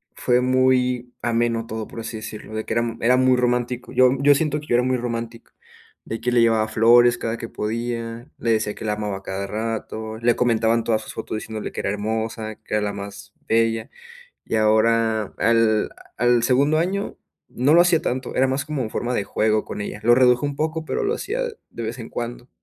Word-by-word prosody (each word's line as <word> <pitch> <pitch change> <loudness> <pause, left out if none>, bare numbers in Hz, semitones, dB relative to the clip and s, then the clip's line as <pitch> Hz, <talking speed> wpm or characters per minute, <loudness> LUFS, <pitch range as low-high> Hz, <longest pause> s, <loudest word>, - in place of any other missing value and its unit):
fue 125 0 +2
muy 125 -1 +2
ameno 115 -1 0
todo, 110 -1 -4
por - - -9
así 115 0 -5
decirlo, 110 0 -8
de 110 - -2
que - - -3
era 115 -1 0
era 125 +2 +4
muy 130 0 +4
romántico. 125 0 -1
Yo 130 -1 +5
yo 145 +1 +6
siento 150 +1 0
que 150 - -11
yo - - +2
era 120 - +3
muy 130 0 +1
romántico. 115 -1 -5 0.5
De 115 - -5
que 125 +1 0
le 120 -1 +4
llevaba 110 -1 +3
flores 120 +2 +5
cada 115 0 -3
que 115 - -7
podía. 115 +2 -4
Le 115 - 0
decía 110 -1 +1
que - - -8
la 105 - 0
amaba 105 -2 -3
a 95 - -13
cada 95 +1 -4
rato. 110 +1 -4
Le 120 0 +2
comentaba 115 -2 +2
en 115 - 0
todas 110 -1 +1
sus - - -9
fotos - - -5
diciéndole 110 -1 -6
que - - -4
era - - -1
hermosa, 110 +1 -3
que - - -5
era 105 - +2
la 105 -1 -2
más 100 0 -9
bella. 115 +1 +1 0.6
Y 110 - -2
ahora, 110 0 +2
al 115 -1 +3 0.3
al 120 0 +3
segundo 140 +5 +3
año 190 +5 -1 0.3
no 140 +6 +2
lo 170 - +8
hacía 175 -3 +3
tanto. 130 0 -3
Era 130 +1 +3
más 135 +1 -1
como 150 -3 -3
en 110 - -4
forma 120 +1 -2
de 105 - +1
juego 110 +1 +1
con - - -6
ella. 105 +1 -5
Lo 120 +1 +6
reduje 125 0 +4
un 140 -1 -4
poco, 160 +1 -2
pero 445 - -2
lo 435 - +1
hacía 465 +2 -3 0.3
de 115 - -7
vez 115 +3 -4
en 115 - -7
cuando. 120 +1 -6
115 Hz, 215 wpm, -22 LUFS, 110-125 Hz, 0.6 s, lo